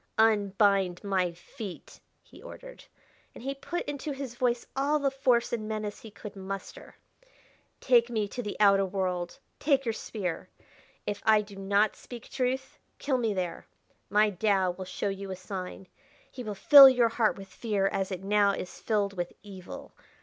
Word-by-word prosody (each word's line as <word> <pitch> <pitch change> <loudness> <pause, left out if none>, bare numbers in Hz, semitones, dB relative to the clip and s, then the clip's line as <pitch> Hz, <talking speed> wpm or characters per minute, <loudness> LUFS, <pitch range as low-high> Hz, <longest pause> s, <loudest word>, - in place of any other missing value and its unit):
"Unbind 200 -4 +3
my 190 -3 0
feet!" 190 +3 -10 0.2
he - - -17
ordered, - - -11 0.5
and - - -11
he 275 +1 -2
put 305 +5 -4
into 290 +1 -4
his 270 -3 -6
voice 240 -1 0
all 280 +3 +2
the 280 -2 0
force 255 -4 +1
and 215 -2 -2
menace 215 -1 -4
he 225 - -10
could 210 0 -10
muster. 195 0 -7 0.8
"Take 240 -2 +4
me 215 -3 -1
to 245 - -5
the 210 -3 -5
outer 200 -1 +5
world. 185 -2 -2 0.2
Take 275 -2 +2
your 230 - 0
spear. 195 -5 -5 0.6
If 205 - -3
I 215 -1 +5
do 205 -1 -13
not 200 +2 +1
speak 240 -2 -11
truth, 265 +1 -2 0.2
kill 265 -3 0
me 225 -3 0
there. 180 -2 -4 0.4
My 210 +2 +4
Tao 190 -1 +1
will 185 +1 -7
show 185 +2 -3
you 195 0 -5
a 190 - -4
sign; 185 0 -7 0.5
he 255 - -8
will 210 -2 -5
fill 275 +6 +10
your 245 -3 +3
heart 225 -2 +1
with 195 -1 -10
fear 205 -1 -1
as 195 0 -1
it 185 0 -5
now 200 0 +3
is 185 - -6
filled 205 -3 0
with 175 -1 -3
evil. 190 -3 -10
210 Hz, 170 wpm, -28 LUFS, 195-240 Hz, 0.8 s, fill